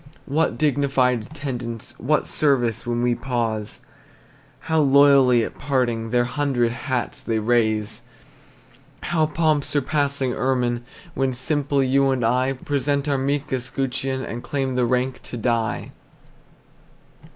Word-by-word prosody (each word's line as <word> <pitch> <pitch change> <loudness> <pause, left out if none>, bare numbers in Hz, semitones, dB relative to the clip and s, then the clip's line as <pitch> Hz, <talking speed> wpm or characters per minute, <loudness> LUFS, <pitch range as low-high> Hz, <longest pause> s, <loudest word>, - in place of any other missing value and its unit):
What 155 +4 0
dignified 135 -4 +2
attendants, 120 -5 -6
What 150 +6 +1
service 125 -7 +1
when 120 0 0
we 120 0 +3
pause! 115 -4 -3 0.8
How 160 0 0
loyally 140 -4 +5
at - - -6
parting 120 -5 0
Their 120 +1 +2
hundred 125 -2 0
hats 125 +1 -3
they 115 -1 -1
raise! 110 -2 0 1.0
How 155 -1 +1
pomp 155 -2 +1
surpassing 140 -2 0
ermine, 125 -2 0 0.3
When 135 -3 0
simple 140 +1 0
you 135 +1 +3
and 130 -3 0
I 130 +3 +2
Present 140 +1 -1
our 140 -2 +1
meek 140 +1 -1
escutcheon, 130 +1 -2
And 120 - -5
claim 135 -1 -2
the 125 -1 +1
rank 125 +2 -1
to 120 - -7
die! 115 0 -1 1.3
II. - - -18
130 Hz, 130 wpm, -23 LUFS, 120-140 Hz, 1.3 s, loyally